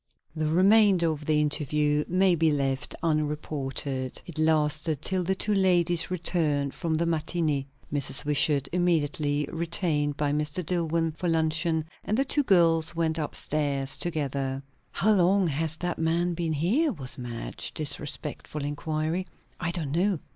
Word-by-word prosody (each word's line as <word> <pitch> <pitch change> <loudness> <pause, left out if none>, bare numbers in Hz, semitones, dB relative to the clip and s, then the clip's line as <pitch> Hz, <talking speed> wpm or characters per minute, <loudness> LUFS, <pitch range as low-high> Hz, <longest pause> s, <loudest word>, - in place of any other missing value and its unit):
The 155 -1 -1
remainder 185 0 +4
of 150 -1 -7
the 155 -1 +3
interview 150 0 +1
may 185 +1 +3
be 160 -1 +2
left 135 -1 -1
unreported. 145 -4 -2
It 165 -3 -8
lasted 155 -1 +1
till 185 -1 0
the 190 +2 0
two 210 +2 +1
ladies 175 -3 +3
returned 160 -6 0
from 165 -3 -2
the 165 +2 0
matinée. 155 -3 -1 0.3
Mrs. 140 -1 0
Wishart 145 -1 +2
immediately 150 -4 +1
retained 160 -3 0
Mr. 150 +3 0
Dillwyn 165 -2 0
for 180 - -3
luncheon, 160 0 +1 0.2
and 215 - -1
the 270 - +2
two 290 +2 +2
girls 170 - +3
went 165 -1 0
up 150 - -3
stairs 140 -3 -1
together. 140 -4 -3 0.3
"How 205 +6 +1
long 190 0 +3
has 160 +2 +2
that 175 +1 -3
man 170 +2 0
been 165 -1 -2
here?" 220 - +1
was 135 - -2
Madge's 120 -2 -5
disrespectful 150 0 -4
inquiry. 155 +4 -2 0.3
"I 175 - -1
don't 165 -5 -3
know." 185 +4 +1
160 Hz, 145 wpm, -27 LUFS, 145-175 Hz, 0.3 s, remainder